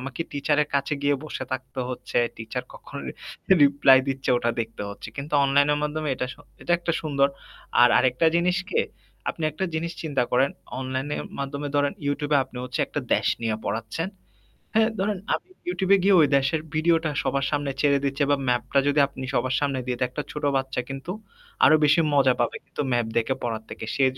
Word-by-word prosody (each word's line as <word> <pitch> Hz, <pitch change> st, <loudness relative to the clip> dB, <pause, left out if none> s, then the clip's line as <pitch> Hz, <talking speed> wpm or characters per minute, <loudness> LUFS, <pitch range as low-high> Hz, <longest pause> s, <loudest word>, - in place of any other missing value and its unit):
আমাকে 135 Hz, +4 st, -7 dB
টিচারের 145 Hz, +1 st, +1 dB
কাছে 140 Hz, +2 st, +1 dB
গিয়ে 145 Hz, 0 st, +3 dB
বসে 140 Hz, -3 st, -5 dB
থাকতে 130 Hz, 0 st, -4 dB
হচ্ছে, 125 Hz, -, -2 dB, 0.2 s
টিচার 115 Hz, -1 st, -5 dB
কখনো -, -, -9 dB, 0.6 s
রিপ্লাই 140 Hz, -1 st, +6 dB
দিচ্ছে 135 Hz, 0 st, -1 dB
ওটা 120 Hz, -1 st, +1 dB
দেখতে 115 Hz, -2 st, -5 dB
হচ্ছে। 100 Hz, -, -9 dB
কিন্তু 140 Hz, +2 st, -6 dB
অনলাইনের 145 Hz, +2 st, +3 dB
মাধ্যমে 150 Hz, +1 st, -2 dB
এটা 125 Hz, -, -2 dB
স -, -, -13 dB, 0.3 s
এটা 175 Hz, -, 0 dB
একটা 170 Hz, -1 st, -1 dB
সুন্দর। 140 Hz, -2 st, +2 dB, 0.5 s
আর 125 Hz, -, +8 dB
আরেকটা 130 Hz, +5 st, +3 dB
জিনিস 180 Hz, +1 st, +2 dB
কি? 460 Hz, -, +2 dB, 0.5 s
আপনি 165 Hz, -, -9 dB
একটা 155 Hz, +6 st, -3 dB
জিনিস 165 Hz, +2 st, -2 dB
চিন্তা 145 Hz, -5 st, 0 dB
করেন। 130 Hz, +3 st, +3 dB, 0.3 s
অনলাইনের 130 Hz, +3 st, -3 dB, 0.2 s
মাধ্যমে 140 Hz, +1 st, -3 dB
ধরেন 145 Hz, 0 st, +2 dB
Youtube 145 Hz, +1 st, -1 dB
এ -, -, +7 dB
আপনি 125 Hz, -, -15 dB
হচ্ছে 125 Hz, -, -3 dB
একটা -, -, -3 dB
দেশ -, -, 0 dB, 0.2 s
নিয়া 110 Hz, -1 st, 0 dB
পড়াচ্ছেন। 115 Hz, +10 st, -3 dB, 0.7 s
হ্যাঁ, 220 Hz, 0 st, +5 dB
ধরেন 200 Hz, 0 st, 0 dB, 0.2 s
আমি -, -, -9 dB, 0.2 s
Youtube 195 Hz, -, -1 dB
এ -, -, +3 dB
গিয়ে 195 Hz, -1 st, +5 dB
ওই 150 Hz, -, +5 dB
দেশের 140 Hz, +4 st, 0 dB
ভিডিওটা 160 Hz, 0 st, +2 dB
সবার 140 Hz, -1 st, 0 dB
সামনে 145 Hz, -1 st, 0 dB
ছেড়ে 140 Hz, -1 st, +4 dB
দিচ্ছি। 140 Hz, +1 st, 0 dB
বা 145 Hz, -, +4 dB
ম্যাপটা 125 Hz, +3 st, +1 dB
যদি 145 Hz, +1 st, +3 dB
আপনি 135 Hz, -1 st, -9 dB
সবার 130 Hz, 0 st, +1 dB
সামনে 140 Hz, -2 st, 0 dB
দিয়ে 125 Hz, -1 st, -2 dB
একটা 150 Hz, +4 st, -4 dB
ছোট 150 Hz, -, -6 dB
বাচ্চা 135 Hz, -1 st, -2 dB
কিন্তু 135 Hz, +5 st, -5 dB, 0.5 s
আরো 155 Hz, -, +7 dB
বেশি 150 Hz, +3 st, +5 dB
মজা 135 Hz, -2 st, +5 dB
পাবে 120 Hz, -, 0 dB
কিন্তু -, -, -5 dB
ম্যাপ 120 Hz, -2 st, +1 dB
দেখে 115 Hz, +3 st, +1 dB
পড়ার 115 Hz, -2 st, -2 dB
থেকে। -, -, -6 dB
সে 140 Hz, -, +2 dB
140 Hz, 190 wpm, -25 LUFS, 130-150 Hz, 0.7 s, আর